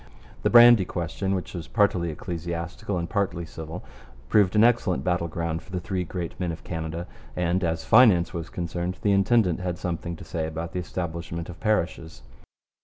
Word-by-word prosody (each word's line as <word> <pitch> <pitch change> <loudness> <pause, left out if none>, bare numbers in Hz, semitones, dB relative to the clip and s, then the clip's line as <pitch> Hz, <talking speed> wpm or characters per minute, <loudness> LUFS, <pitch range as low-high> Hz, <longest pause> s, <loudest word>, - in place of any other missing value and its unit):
The - - +2
brandy 120 -3 +8
question, 95 +3 -2
which 90 - -5
was 85 -3 -6
partly 95 -6 +2
ecclesiastical 85 +4 -4
and 85 0 -2
partly 95 -5 -1
civil, 80 +2 -8 0.5
proved 105 -2 +4
an 105 - +6
excellent 115 -6 +2
battle 90 -2 0
ground 85 0 -3
for - - -17
the 90 - -2
three 90 +1 -2
great 85 0 -5
men 90 -2 -1
of 80 - -8
Canada; 80 0 -4 0.3
and, 90 +1 0
as 80 -1 -1
finance 105 -8 +5
was 85 -1 -5
concerned, 85 +1 -3
the 105 - +3
intendant 100 -2 +3
had 90 -1 -3
something 85 -1 -4
to - - -11
say 80 -2 -3
about 80 +1 -5
the 90 - -2
establishment 85 -2 -5
of 85 -1 -9
parishes. 85 -6 -1
90 Hz, 180 wpm, -25 LUFS, 85-95 Hz, 0.5 s, brandy